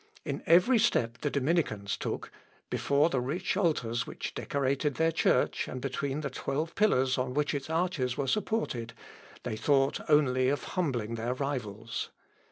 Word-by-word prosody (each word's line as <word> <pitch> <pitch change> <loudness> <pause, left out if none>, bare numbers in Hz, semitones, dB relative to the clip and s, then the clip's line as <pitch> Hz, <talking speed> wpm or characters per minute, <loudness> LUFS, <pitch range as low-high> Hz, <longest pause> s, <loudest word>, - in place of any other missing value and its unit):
In - - -3
every 180 +9 +6
step 120 - +1
the 145 - -1
Dominicans 135 - 0
took - - -4 0.4
before 145 +3 +2
the 130 - +1
rich 160 +11 -1
altars 125 - 0
which - - -5
decorated 140 0 -1
their 165 0 +2
church, 165 - +2
and 130 - -5
between 135 +3 -2
the 140 -3 -3
twelve 150 +5 -2
pillars 130 -11 +2
on 125 0 -2
which 150 0 +1
its 140 +1 -4
arches 160 -7 0
were 140 - 0
supported 130 - -1 0.5
they - - -3
thought 135 +3 +2
only 130 -4 +4
of 145 - -1
humbling 125 -11 -1
their 115 +2 -2
rivals. 115 -6 -4
140 Hz, 155 wpm, -30 LUFS, 125-160 Hz, 0.5 s, every